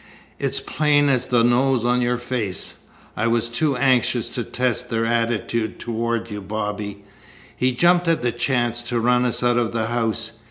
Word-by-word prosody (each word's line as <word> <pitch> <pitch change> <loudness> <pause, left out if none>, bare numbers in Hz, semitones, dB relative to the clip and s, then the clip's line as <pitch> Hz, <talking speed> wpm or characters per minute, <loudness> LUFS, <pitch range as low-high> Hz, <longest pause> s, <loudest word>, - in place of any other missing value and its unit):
"It's - - +1
plain 145 -1 +2
as 130 -3 +1
the 120 -2 +3
nose 120 0 +2
on 125 0 +2
your 120 0 +1
face. 120 -7 -3 0.4
I 115 - 0
was 115 0 +1
too 135 +3 0
anxious 125 -2 +2
to 120 - -3
test 125 0 -2
their 115 -1 0
attitude 115 -1 -1
toward 115 0 -2
you, 105 0 -5
Bobby. 105 0 -4 0.5
He 130 0 +1
jumped 175 +6 +3
at 165 -6 +1
the 120 - +1
chance 120 -1 0
to 120 0 -2
run 125 +1 +2
us 125 0 -1
out 120 0 +3
of 115 -2 0
the 115 -1 0
house. 115 -1 -2
120 Hz, 175 wpm, -22 LUFS, 115-125 Hz, 0.5 s, the